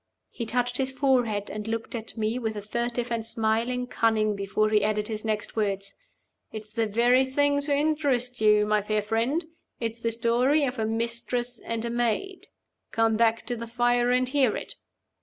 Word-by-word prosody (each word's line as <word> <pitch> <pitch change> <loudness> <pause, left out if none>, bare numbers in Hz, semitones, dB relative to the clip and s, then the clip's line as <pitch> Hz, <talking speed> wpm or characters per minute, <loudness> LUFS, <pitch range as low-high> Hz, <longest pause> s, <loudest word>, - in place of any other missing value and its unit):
He 235 - -5
touched 245 +1 0
his 265 -1 0
forehead, 250 -6 +1
and 210 0 -5
looked 225 0 -3
at 230 0 -6
me 220 +3 -1
with 220 -3 -3
a 205 - -4
furtive 235 +2 -2
and 230 -1 -1
smiling 230 +2 0
cunning 220 -3 +1
before 200 +2 0
he 210 -1 +3
added 210 0 0
his 215 -1 -4
next 215 -1 -3
words. 200 -2 -1 0.6
"It's 215 -1 -8
the 225 -1 0
very 240 +5 +4
thing 285 +2 +1
to 285 0 +1
interest 280 -5 0
you, 210 -1 +5
my 210 0 +2
fair 210 0 -1
friend. 235 - 0 0.3
It's 230 0 -3
the 230 - 0
story 240 +6 +2
of 255 -2 -3
a 220 - 0
Mistress 235 +2 -1
and 230 0 -4
a 235 - -2
Maid. 240 - -1 0.4
Come 225 -1 +2
back 230 0 +2
to 245 - -2
the 230 0 -6
fire 240 +1 +2
and 250 +1 +2
hear 260 -4 +2
it." - - -7
230 Hz, 185 wpm, -26 LUFS, 220-250 Hz, 0.6 s, you